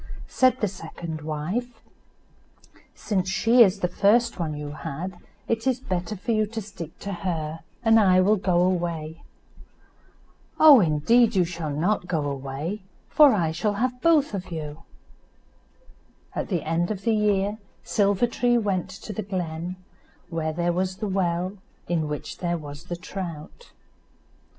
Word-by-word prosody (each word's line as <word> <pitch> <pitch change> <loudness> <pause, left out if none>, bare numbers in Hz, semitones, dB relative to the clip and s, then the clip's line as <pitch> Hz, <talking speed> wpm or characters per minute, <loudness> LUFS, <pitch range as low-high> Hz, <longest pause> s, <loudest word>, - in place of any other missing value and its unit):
Said 255 -1 +2
the 210 - +2
second 165 -3 -7
wife, 180 +11 -3 1.2
"Since 190 -3 -1
she 230 +5 +4
is 200 -2 +5
the 180 - +2
first 230 +4 +2
one 155 -3 -2
you 150 0 -5
had 155 +5 -6 0.3
it 230 +2 -1
is 260 -1 +2
better 185 -4 -3
for 200 - -3
you 215 -1 +2
to 225 +2 -5
stick 190 -6 -9
to 200 - -4
her, 165 -4 -3 0.3
and 225 0 +6
I 185 -3 +5
will 205 +4 +4
go 180 -2 +2
away." 170 -3 -2 1.4
"Oh! 300 -4 +9
indeed 210 +8 +3
you 180 -2 +4
shall 170 -2 -5
not 175 +6 0
go 160 -5 -1
away, 140 +8 -4 0.3
but 300 -2 +9
I 170 -8 +1
shall 205 +6 -1
have 250 +4 -2
both 310 -7 +3
of 190 -2 -4
you." 155 -1 -6 1.5
At - - -3
the 175 -5 -1
end 165 +2 0
of 205 -3 -4
the 230 - +2
year, 210 0 +1 0.2
Silver 200 +1 +2
tree 240 0 +1
went 195 -5 -1
to 195 +3 -8
the 215 - -3
glen, 180 -3 -4 0.5
where 160 -2 -2
there 175 +2 0
was 185 +1 -1
the 210 +2 -4
well, 185 0 -1 0.3
in 165 -3 0
which 150 0 -6
there 175 -1 -1
was 145 +1 -9
the 175 - -4
trout. 180 - -7
185 Hz, 155 wpm, -25 LUFS, 165-215 Hz, 1.5 s, Oh